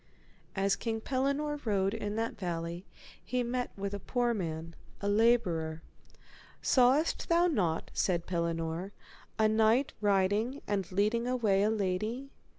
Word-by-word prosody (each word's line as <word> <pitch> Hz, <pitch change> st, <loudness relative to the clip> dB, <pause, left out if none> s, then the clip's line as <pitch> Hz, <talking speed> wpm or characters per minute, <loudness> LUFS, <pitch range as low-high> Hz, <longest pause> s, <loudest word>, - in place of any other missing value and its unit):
As 195 Hz, 0 st, +2 dB
King 225 Hz, +2 st, -3 dB
Pellinore 280 Hz, +4 st, -1 dB
rode 195 Hz, -3 st, +1 dB
in 210 Hz, -2 st, -3 dB
that 225 Hz, +1 st, -2 dB
valley 170 Hz, -1 st, -4 dB, 0.4 s
he 245 Hz, +6 st, -1 dB
met 245 Hz, +1 st, -2 dB
with 200 Hz, 0 st, -3 dB
a 200 Hz, -, -3 dB
poor 240 Hz, +3 st, 0 dB
man, 165 Hz, -5 st, -4 dB, 0.3 s
a 200 Hz, -, -3 dB
labourer. 185 Hz, -8 st, +2 dB, 0.8 s
Sawest 265 Hz, +5 st, +3 dB
thou 340 Hz, +1 st, +4 dB
not, 185 Hz, -, 0 dB
said 175 Hz, -3 st, 0 dB
Pellinore, 170 Hz, +2 st, -2 dB, 0.4 s
a 220 Hz, -, +4 dB
knight 220 Hz, +5 st, +3 dB
riding 205 Hz, +6 st, +1 dB
and 195 Hz, -3 st, -2 dB
leading 215 Hz, +5 st, +1 dB
away 220 Hz, -6 st, +2 dB
a 210 Hz, -, +3 dB
lady? 220 Hz, +6 st, -2 dB
205 Hz, 135 wpm, -31 LUFS, 185-240 Hz, 0.8 s, thou